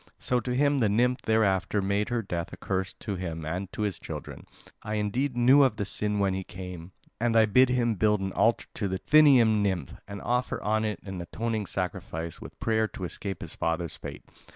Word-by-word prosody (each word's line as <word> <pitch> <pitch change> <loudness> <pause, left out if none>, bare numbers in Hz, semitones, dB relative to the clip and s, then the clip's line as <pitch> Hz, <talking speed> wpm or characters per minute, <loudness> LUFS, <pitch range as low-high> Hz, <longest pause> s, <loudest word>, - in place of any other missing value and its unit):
So 125 - 0
to 125 0 -3
him 140 +1 +3
the 110 -4 +3
nymph 125 +4 +2
thereafter 105 -3 +2
made 100 +2 0
her 120 -2 -1
death 85 -4 -4
a - - -8
curse, 95 -1 -2
to 100 -4 -3
him 80 -3 -5
and 90 +4 -4
to 105 - -3
his 100 -4 -2
children. - - -8 0.3
I 105 0 -3
indeed 120 +6 -1
knew 130 +4 +6
of 130 -6 +4
the 100 -1 -2
sin 105 +1 -1
when 100 -1 +2
he 95 0 -3
came; 90 -1 -8 0.3
and 115 0 +2
I 110 - +7
bid 125 +5 +5
him 120 -2 +2
build 105 +1 +2
an 95 0 -3
altar 115 +1 +2
to 105 - -2
the 95 0 -2
Thynian 125 -5 +5
nymph, 95 -9 -1
and 100 0 -7
offer 125 +1 0
on 110 +1 +1
it 105 -1 -3
an 95 -3 -6
atoning 110 +3 -3
sacrifice, 85 -3 -4
with - - -11
prayer 110 -1 +1
to 95 - -9
escape 95 +2 -5
his - - -7
father's 85 0 -2
fate. - - -8
105 Hz, 210 wpm, -28 LUFS, 95-115 Hz, 0.3 s, I